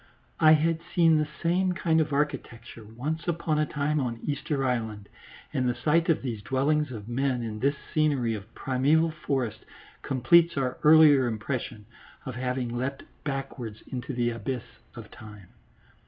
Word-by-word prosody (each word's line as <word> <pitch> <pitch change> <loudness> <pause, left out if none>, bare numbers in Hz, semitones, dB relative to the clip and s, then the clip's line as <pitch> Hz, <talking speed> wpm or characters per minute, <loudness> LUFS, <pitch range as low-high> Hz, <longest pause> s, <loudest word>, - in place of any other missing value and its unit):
I 155 -1 +7
had 160 +1 +2 0.2
seen 165 -3 +5
the 150 - 0 0.2
same 180 +2 +2
kind 160 -2 +2
of 155 -1 -2
architecture 140 -5 -3
once 135 +11 -5
upon 165 -2 0
a 155 - +1
time 150 +1 -1
on 120 -4 -3
Easter 145 -1 -2
Island, 110 -5 -2 0.5
and 125 -1 +1
the 120 - -1
sight 160 +7 +1
of 160 - +2
these 115 -6 -4
dwellings 140 +5 0
of 110 -4 -8
men 125 0 -1
in 110 -2 -5
this 140 +4 +1 0.2
scenery 140 -7 +1
of 110 +1 -8
primeval 150 +5 +2
forest 135 -6 -2 0.4
completes 170 +5 +3
our 130 -2 -1
earlier 150 -4 +7
impression 110 -1 -4 0.4
of 130 - -5
having 125 -1 -3
leapt 130 +3 -3 0.2
backwards 135 -6 -5
into 125 +2 -4
the 120 -1 +1
abyss 120 +1 -4 0.3
of 115 -3 -10
time. 105 -5 -13
135 Hz, 155 wpm, -27 LUFS, 120-155 Hz, 0.5 s, I